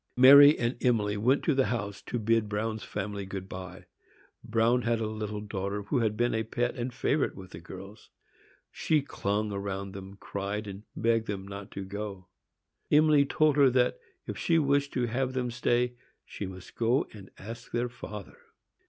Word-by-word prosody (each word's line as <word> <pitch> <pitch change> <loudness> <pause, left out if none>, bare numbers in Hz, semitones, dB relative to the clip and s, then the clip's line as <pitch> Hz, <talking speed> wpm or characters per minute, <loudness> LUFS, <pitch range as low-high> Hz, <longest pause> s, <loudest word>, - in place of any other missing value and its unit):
Mary 140 +3 +9
and 120 +1 -2
Emily 105 -4 +2
went 125 +7 +2
to 160 - +2
the 135 -1 +2
house 105 -4 -3
to 120 - -4
bid 115 -1 +1
Bruin's 110 +1 -2
family 100 0 -4
good 95 0 -6
by. 95 -1 -8 0.6
Bruin 115 +2 +2
had 115 -1 0
a 110 - -1
little 105 -1 -4
daughter 100 0 -3
who 125 +6 0
had 110 -2 0
been 120 0 +1
a 110 - +1
pet 120 +2 -1
and 125 0 -3
favorite 140 +4 0
with 95 -1 -11
the 85 - -8
girls. 95 +4 -11 0.6
She 155 -3 +1
clung 105 -5 -2
round 100 -1 -4
them, 95 0 -9
cried, 100 +2 -4
and 100 0 -7
begged 115 -1 +1
them 100 -1 -4
not 100 +1 -8
to 100 - -5
go. 100 -2 -6 0.6
Emily 150 -2 +5
told 155 0 +3
her 140 -2 +7
that, 125 0 +2 0.3
if - - -6
she 165 - +2
wished 140 -2 +2
to 125 -2 +1
have 130 +2 -1
them 125 -2 -1
stay, 120 0 +1 0.3
she 100 - -6
must 95 -1 -10
go 120 +4 +1
and 100 -3 -11
ask 115 +4 -9
her 120 +1 0
father. 105 -4 -9
110 Hz, 180 wpm, -29 LUFS, 100-125 Hz, 0.6 s, Mary